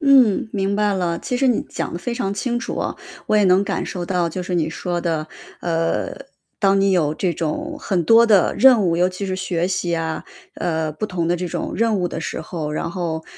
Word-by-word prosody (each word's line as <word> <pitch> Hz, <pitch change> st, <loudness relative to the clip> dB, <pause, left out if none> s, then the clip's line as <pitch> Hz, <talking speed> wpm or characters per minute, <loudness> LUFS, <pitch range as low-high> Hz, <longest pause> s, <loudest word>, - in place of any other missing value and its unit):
嗯， 260 Hz, -, +5 dB
明 195 Hz, -1 st, 0 dB
白 210 Hz, -1 st, +2 dB
了。 175 Hz, -3 st, -1 dB
其 250 Hz, -, -3 dB
实 270 Hz, +2 st, +2 dB
你 245 Hz, -3 st, +2 dB
讲 -, -, -5 dB
得 170 Hz, -, -4 dB
非 235 Hz, +6 st, -3 dB
常 200 Hz, -5 st, -2 dB
清 240 Hz, +4 st, -1 dB
楚 235 Hz, -, -5 dB
啊， -, -, -2 dB, 0.3 s
我 215 Hz, -, +2 dB
也 210 Hz, -, +4 dB
能 185 Hz, +1 st, +5 dB
感 -, -, -2 dB
受 180 Hz, -2 st, -4 dB
到 175 Hz, -1 st, 0 dB
就 180 Hz, +3 st, -4 dB
是 180 Hz, 0 st, -3 dB
你 160 Hz, -3 st, +1 dB
说 175 Hz, +2 st, -3 dB
的， 160 Hz, -2 st, -2 dB, 0.3 s
呃， 165 Hz, -1 st, -1 dB, 0.5 s
当 195 Hz, -1 st, +3 dB
你 195 Hz, 0 st, +3 dB
有 160 Hz, -5 st, +2 dB
这 180 Hz, +1 st, 0 dB
种 170 Hz, -, -3 dB
很 185 Hz, -4 st, 0 dB
多 230 Hz, +5 st, +6 dB
的 205 Hz, -5 st, +4 dB
任 255 Hz, -4 st, +7 dB
务， 170 Hz, -2 st, +2 dB
尤 180 Hz, +1 st, +3 dB
其 185 Hz, +2 st, -5 dB
是 190 Hz, -1 st, -2 dB
学 180 Hz, -2 st, -1 dB
习 180 Hz, -2 st, -1 dB
啊， 160 Hz, -1 st, -3 dB, 0.3 s
呃， 160 Hz, -2 st, -1 dB
不 155 Hz, +8 st, -3 dB
同 180 Hz, -5 st, -2 dB
的 175 Hz, -, +2 dB
这 180 Hz, +1 st, -3 dB
种 170 Hz, -, -4 dB
任 225 Hz, -1 st, +2 dB
务 180 Hz, -1 st, 0 dB
的 165 Hz, -, -5 dB
时 -, -, -4 dB
候。 160 Hz, -2 st, -5 dB
然 155 Hz, -, -2 dB
后， 165 Hz, -3 st, -3 dB
180 Hz, 245 characters per minute, -21 LUFS, 170-205 Hz, 0.5 s, 任